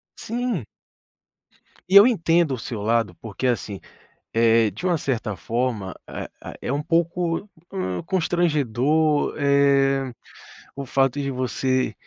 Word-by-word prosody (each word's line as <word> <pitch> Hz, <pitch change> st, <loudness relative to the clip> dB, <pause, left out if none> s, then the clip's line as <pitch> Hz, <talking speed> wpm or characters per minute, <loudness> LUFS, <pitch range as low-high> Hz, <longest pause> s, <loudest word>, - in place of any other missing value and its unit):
Sim. 235 Hz, -, -3 dB, 1.2 s
E 190 Hz, -, +2 dB
eu 200 Hz, +3 st, +10 dB
entendo 165 Hz, -, +2 dB
o -, -, -2 dB
seu 115 Hz, -2 st, -6 dB
lado 115 Hz, +2 st, +1 dB
porque, 110 Hz, +2 st, -6 dB
assim, 105 Hz, -5 st, -2 dB, 0.5 s
eh, 115 Hz, -1 st, +4 dB
de 110 Hz, -, -8 dB
uma 175 Hz, -2 st, +2 dB
certa 115 Hz, -7 st, -2 dB
forma, 115 Hz, -1 st, -2 dB
ah -, -, -6 dB
ah, -, -, -8 dB
é -, -, -3 dB
um 145 Hz, +2 st, 0 dB
pouco, 170 Hz, +4 st, 0 dB, 0.2 s
hum, 90 Hz, -1 st, -3 dB
constrangedor, 155 Hz, -, +1 dB
eh, 140 Hz, -2 st, +3 dB, 0.6 s
o 140 Hz, -, -5 dB
fato 135 Hz, +1 st, +1 dB
de 140 Hz, -, -2 dB
você 130 Hz, -2 st, -1 dB
135 Hz, 130 wpm, -23 LUFS, 115-165 Hz, 1.2 s, eu